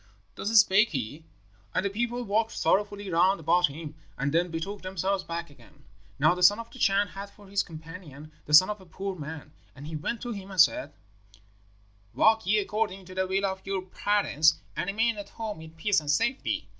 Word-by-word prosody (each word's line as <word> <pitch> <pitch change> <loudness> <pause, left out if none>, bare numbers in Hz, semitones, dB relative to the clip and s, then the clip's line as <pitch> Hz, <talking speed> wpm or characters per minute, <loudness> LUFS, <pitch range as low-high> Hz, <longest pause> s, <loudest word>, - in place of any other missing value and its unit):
"Thus 205 - -4
spake 210 +2 +5
he, 140 +4 -5 0.5
and 185 - +1
the - - +1
people 240 +3 -2
walked 220 +1 0
sorrowfully 205 -1 0
round 180 +3 +3
about 175 +3 +3
him, 150 +1 -8 0.2
and 140 +1 -1
then 175 +2 +2
betook 180 +5 -5
themselves 190 +1 -2
back 170 -3 -5
again. 125 -5 -20 0.3
Now 155 +4 +4
the 180 - -6
son 200 +4 +7
of 230 0 -8
the 260 - -12
Chan 200 -1 +3
had 200 +1 -8
for 205 0 -18
his 200 +1 +1
companion 155 -2 -10 0.2
the 150 - +6
son 185 +6 +7
of 210 -2 -7
a - - -15
poor 195 +3 -5
man, 155 -1 -8 0.2
and 140 +1 -10
he 155 +1 -6
went 190 +10 -3
to 245 - -4
him 200 -3 -7
and 190 -2 -6
said, 155 -2 +4 1.2
'Walk 220 -3 +4
ye 215 +2 +4
according 205 -2 -2
to 185 - -11
the 190 0 -1
will 195 +1 0
of 190 0 -3
your 195 -1 -3
parents, 185 -5 +2 0.2
and - - -2
remain 220 +3 +1
at 205 -1 -7
home 215 -6 -6
in 160 - -10
peace 195 +4 +2
and 150 -2 -8
safety. 255 - 0
190 Hz, 205 wpm, -27 LUFS, 160-205 Hz, 1.2 s, son